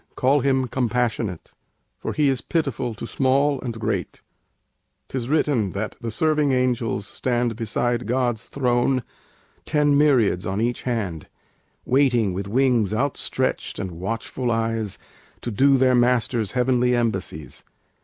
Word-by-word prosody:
call 135 +3 +3
Him 130 -1 +1
"Compassionate,"_ 120 -6 -1 0.5
For - - -4
He 150 -2 +2
is 135 -2 +1
pitiful 135 -8 -2
to 110 - -6
small 135 +3 +1
and 115 -3 -5
great. 100 -5 -3 0.9
'Tis 125 -2 -3
written 140 - +1
that 105 +2 -4
the 115 - -3
serving 150 +4 +1
angels 125 -5 0
stand 120 0 -1
Beside 120 +1 -1
God's 120 -2 -1
throne, 125 -1 +1 0.6
ten 145 -1 +2
myriads 130 -11 +3
on 95 +3 -2
each 120 +2 -1
hand, 95 -10 -3 0.6
Waiting, 125 -7 +2
with 95 +2 -4
wings 115 -2 +2
outstretched 135 +4 -1
and 95 - -4
watchful 115 +8 -3
eyes, 115 -3 -1 0.4
To 120 - -4
do 135 +6 +4
their 130 0 +4
Master's 120 -3 +2
heavenly 125 -1 +2
embassies. 95 - -3
120 Hz, 130 wpm, -23 LUFS, 110-130 Hz, 0.9 s, do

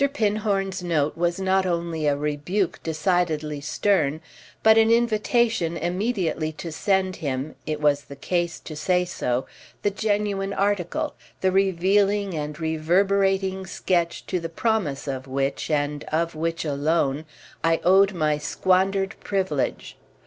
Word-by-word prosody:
Pinhorn's 205 -6 0
note 155 -4 0
was 175 +1 0
not 190 0 +2
only 170 -3 -1
a 145 -1 +2
rebuke 150 +6 -1
decidedly 160 -3 0
stern, 155 -1 +1 0.4
but 220 0 +7
an 225 0 +5
invitation 230 -5 +2
immediately 175 -3 -1
to 165 +1 -7
send 190 +3 0
him—it 150 +2 -4
was 145 -2 +2
the 140 - -10
case 175 +4 -1
to 155 - -8
say 180 +3 +1
so—the 130 +6 -3
genuine 205 -1 -1
article, 205 - 0 0.3
the 190 - +3
revealing 195 +1 +2
and 150 0 -4
reverberating 190 +4 +1
sketch 170 -2 -1
to 180 - -1
the 165 -1 -5
promise 165 -7 -1
of 135 -1 -4
which, 135 +1 -2
and 145 -1 0
of 165 +2 -1
which 165 +1 -2
alone, 145 0 0 0.4
I 165 0 +3
owed 195 +2 +5
my 155 -3 +1
squandered 195 +5 +1
privilege. 185 -9 -2
175 Hz, 125 wpm, -24 LUFS, 155-195 Hz, 0.4 s, but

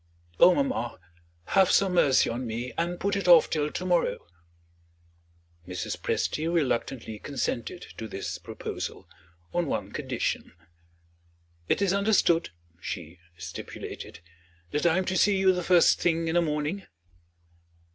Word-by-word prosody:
"Oh, 180 - +8
mamma, 265 - -1 0.5
have 190 -1 +4
some 195 -2 +3
mercy 140 -7 +4
on 120 +2 -3
me, 120 +2 -4
and 175 +1 -2
put 200 +1 0
it 195 -2 -2
off 170 -3 +7
till 150 -1 0
to 180 - -5
morrow!" 175 -2 +1 1.4
Mrs. 90 -1 -4
Presty 160 +2 -1
reluctantly 125 -7 -1
consented 140 +5 -3 0.2
to 110 - -5
this 95 - -5
proposal, - - -6 0.5
on 175 -2 0
one - - -3
condition. - - -3 1.2
"It - - +2
is 195 -1 +2
understood," 200 -4 +3 0.3
she 85 -1 -6 0.2
stipulated 85 0 -8 0.5
"that 150 +4 +1
I 170 +1 +3
am 190 - 0
to 185 - -1
see 200 +2 +4
you 190 -1 +4
the 180 - -2
first 175 -1 +4
thing 165 -1 +1
in 160 - 0
the 175 - +4
morning?" 155 +4 -2
165 Hz, 135 wpm, -27 LUFS, 125-185 Hz, 1.4 s, Oh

